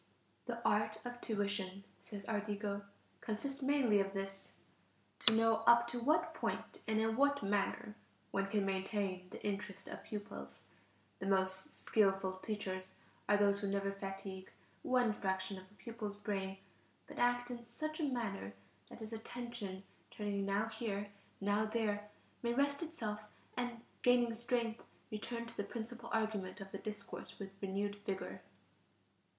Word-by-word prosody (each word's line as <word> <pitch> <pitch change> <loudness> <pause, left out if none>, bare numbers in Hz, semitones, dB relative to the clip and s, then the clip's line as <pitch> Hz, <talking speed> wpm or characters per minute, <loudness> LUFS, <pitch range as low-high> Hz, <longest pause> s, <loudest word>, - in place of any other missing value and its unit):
"The 235 -1 0
art 215 +1 +3
of 245 0 -5
tuition," 200 -3 0 0.2
says 200 -2 -7
Ardigo, 205 -1 -1 0.4
"consists 270 +6 -2
mainly 265 -6 +5
of 195 0 +1
this: 195 0 -4 0.7
to 235 - +7
know 225 0 +5
up 235 0 +9
to 240 0 -1
what 300 +7 +3
point - - -2
and 220 0 +3
in 220 0 +3
what 285 0 +4
manner 205 +1 +1 0.4
one 195 0 +2
can 200 0 +2
maintain 190 -1 0
the - - -7
interest 200 -1 -2
of - - -6
pupils. 70 - -6 0.6
The 195 - -2
most 190 -1 +1
skilful 195 -3 +4
teachers 190 -2 -3 0.3
are 205 - +7
those 200 0 +4
who 200 - +1
never 200 0 +1
fatigue 195 -1 -5 0.3
one 250 -3 +4
fraction 190 -1 -1
of 185 0 -14
the 210 - -21
pupil's 215 -3 -5
brain, 195 -2 -1 0.5
but - - -8
act 245 0 +3
in 240 -1 -5
such 310 +6 -3
a - - +1
manner 200 - -2 0.3
that - - -10
his 220 +1 -5
attention, 225 -4 -4 0.3
turning 200 -2 -1
now 200 +2 +3
here, 205 -3 -2 0.3
now 205 +2 +3
there, 210 -2 0 0.3
may 235 0 +1
rest 280 +2 +3
itself 235 -11 -2 0.4
and, 245 -1 -1 0.2
gaining 245 -1 +5
strength, 235 0 0 0.3
return 235 +2 -3
to 235 0 -9
the 205 - 0
principal 235 +2 -5
argument 215 -4 0
of 195 0 -7
the 195 - -4
discourse 210 -1 -5
with 195 -1 -5
renewed 200 +1 0
vigor." 200 -2 -3
210 Hz, 150 wpm, -38 LUFS, 195-235 Hz, 0.7 s, up